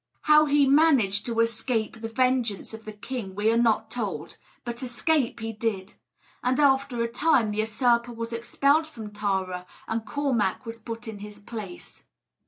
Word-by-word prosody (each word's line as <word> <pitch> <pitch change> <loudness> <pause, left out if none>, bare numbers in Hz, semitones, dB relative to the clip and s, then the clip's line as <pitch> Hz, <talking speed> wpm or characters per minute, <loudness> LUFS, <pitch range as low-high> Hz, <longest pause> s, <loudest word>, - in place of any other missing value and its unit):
How 305 0 +6
he 290 0 +4
managed 270 -9 +4
to 230 -1 -1
escape 230 -1 -1
the 225 - -3
vengeance 245 -4 0
of 220 0 -9
the 215 - -6
king 210 -2 -6
we 210 +2 +2
are - - +2
not 230 -2 +2
told; - - -4 0.3
but 240 0 -4
escape 250 +2 0
he 225 0 -4
did; 210 -3 -3 0.5
and 255 +2 +1
after 265 -4 +3
a - - 0
time 245 -2 +2
the 210 - -3
usurper 235 +2 +2
was 230 0 -5
expelled 280 +7 +2
from 220 -9 -9
Tara, 190 -3 -2 0.2
and 225 0 -2
Cormac 240 -2 -1
was 230 0 -7
put 230 +1 -7
in 215 -2 -6
his 210 0 -9
place. 205 -4 -9
230 Hz, 170 wpm, -26 LUFS, 215-255 Hz, 0.5 s, How